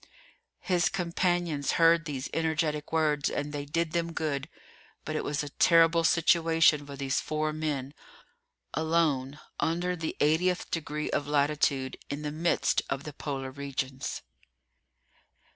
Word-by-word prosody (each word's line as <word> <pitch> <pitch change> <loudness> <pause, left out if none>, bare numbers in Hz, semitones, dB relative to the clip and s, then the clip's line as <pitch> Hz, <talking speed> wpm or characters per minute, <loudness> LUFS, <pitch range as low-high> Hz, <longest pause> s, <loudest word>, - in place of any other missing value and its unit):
His 175 -3 +2
companions 175 -4 0
heard 165 0 +4
these 140 -4 -4
energetic 160 -2 -1
words, 150 -3 +1
and 145 +1 -3
they 145 -1 -4
did 165 +2 -1
them 170 0 -1
good; 150 -2 -2 0.6
but 155 - -3
it - - -1
was 145 0 -1
a 145 - -6
terrible 165 +2 +4
situation 165 -2 +4
for 140 - -7
these 135 -1 -1
four 155 0 -1
men, 145 -3 -3 0.8
alone, 155 -4 0 0.2
under 175 +2 0
the 160 -2 -4
80th 175 +5 +1
degree 150 -2 -3
of 145 - -1
latitude, 145 -2 +1
in 145 +1 -4
the 150 - -3
midst 165 +3 +1
of 135 +1 -2
the 150 - -7
Polar 135 -2 -4
Regions! 135 -1 -4
155 Hz, 135 wpm, -29 LUFS, 145-165 Hz, 0.8 s, heard